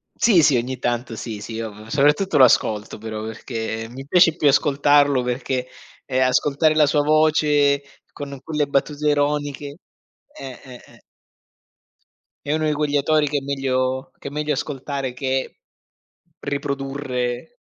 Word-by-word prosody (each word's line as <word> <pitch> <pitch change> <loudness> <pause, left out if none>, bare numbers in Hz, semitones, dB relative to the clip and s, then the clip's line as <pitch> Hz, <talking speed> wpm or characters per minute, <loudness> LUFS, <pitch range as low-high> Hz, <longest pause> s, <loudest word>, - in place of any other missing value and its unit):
Sì, 195 -9 +4
sì, 140 -4 +4
ogni 125 +2 -3
tanto 120 -1 -2
sì, 110 -2 -6
sì, 110 +2 -7
io 110 -1 -7
soprattutto 150 +6 +2
lo 130 - +8
ascolto 110 -3 +2
però 110 0 -6
perché 110 0 -5
mi 135 +3 -9
piace 165 +1 +4
più 150 - +1
ascoltarlo 145 -1 +3
perché, 125 +1 -2 0.4
ehm, 130 -1 +1
ascoltare 145 +4 +2
la 155 -1 +5
sua 145 +1 +2
voce 150 -2 +3 0.3
con 140 -1 -7
quelle 150 -2 -1
battute 145 +2 -1
ironiche. 145 0 -1 0.6
Eh, 130 -2 -9
eh, 125 -2 -12
eh. - - -20 1.5
È 145 - -1
uno 155 0 -1
di 150 - +1
quegli 145 -1 0
autori 150 +1 +2
che 145 0 -1
è - - -2
meglio 130 -1 -2
che 140 - -7
è - - -16
meglio 150 0 -1
ascoltare 135 -1 -4
che 130 0 -3 0.8
riprodurre. 135 - -4
140 Hz, 145 wpm, -21 LUFS, 125-145 Hz, 1.5 s, lo